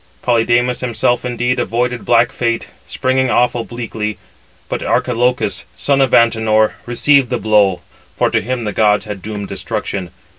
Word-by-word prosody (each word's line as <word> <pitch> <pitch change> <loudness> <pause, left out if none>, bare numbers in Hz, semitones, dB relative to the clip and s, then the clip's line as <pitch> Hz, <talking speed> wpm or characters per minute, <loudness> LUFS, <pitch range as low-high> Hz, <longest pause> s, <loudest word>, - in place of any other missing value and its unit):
Polydamas 120 +1 +2
himself 120 0 0
indeed 125 0 -1
avoided 120 +1 -1
black 120 0 +3
fate, 115 -1 -2 0.2
springing 130 0 0
off 120 0 +2
obliquely; 115 -2 -4 0.5
but - - -3
Archilochus, 125 +1 0
son 140 -1 +1
of 130 -2 +2
Antenor, 110 -2 +3
received 135 +2 +3
[the 125 - 0
blow], 100 -5 +2 0.4
for - - +1
to - - +1
him 125 +2 -3
the 105 -2 -3
gods 105 0 +2
had 105 -3 -6
doomed 105 0 -6
destruction. 95 -3 -4
120 Hz, 145 wpm, -16 LUFS, 110-125 Hz, 0.5 s, black